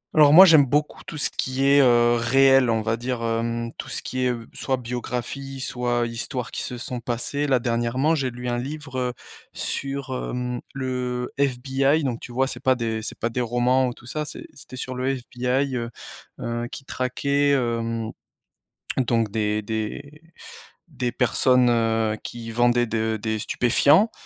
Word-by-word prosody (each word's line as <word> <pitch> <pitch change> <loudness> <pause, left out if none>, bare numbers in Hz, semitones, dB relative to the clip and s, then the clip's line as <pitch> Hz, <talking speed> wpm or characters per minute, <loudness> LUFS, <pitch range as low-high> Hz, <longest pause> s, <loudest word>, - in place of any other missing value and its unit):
Alors 150 -2 +7
moi, 185 +5 +10
j'aime 155 -6 +6
beaucoup 150 +3 -1
tout 150 - -7
ce - - +1
qui 130 +1 -2
est, 140 +1 +6
heu, 120 -2 +5
réel 135 +2 +4
on 110 -1 +1
va 115 +1 0
dire, 120 0 -3
hem, 115 0 -1
tout - - -6
ce - - -3
qui 130 0 -2
est, - - +3
heu, 115 -2 -4
soit 135 -1 -1
biographie 125 +2 -5
soit 120 -1 -1
histoires 120 +2 -4
qui - - -3
se 125 - -4
sont 120 0 -4
passées. 125 +5 -2
Là, 135 -2 +4
dernièrement 120 +5 0
j'ai 140 -5 0
lu 125 0 -7
un 120 0 -1
livre, 140 0 -5
heu, 125 -1 -1 0.4
sur, 140 -1 -3
heu, 125 -1 -3 0.2
le 125 -2 -3
FBI 135 +3 +1
donc 125 -4 -2
tu 120 - -10
vois, 130 +2 +1
c'est 135 - -5
pas 130 0 +3
des 115 -2 -2
c'est - - -3
pas 115 - -1
des 125 +2 -2
romans 125 +2 +2
ou 125 - -3
tout - - -17
ça, 150 +5 -3
c'est 240 - -7
c'était - - -11
sur 130 +1 -5
le 130 +2 -1
FBI, 125 +2 -1
heu 115 -1 -3 0.5
heu, 120 0 -3
qui 135 - -9
traquait, 140 +3 0
hem, 115 -3 -1 0.9
donc 115 -4 +1
des 105 -1 0
des 110 +8 -5 0.7
des 125 -5 -2
personnes, 125 0 +3
heu, 115 -2 +1
qui 115 -1 -7
vendaient 120 +1 +3
de 110 -1 -1
des 110 0 -1
stupéfiants 140 - +3
125 Hz, 180 wpm, -24 LUFS, 115-135 Hz, 0.9 s, moi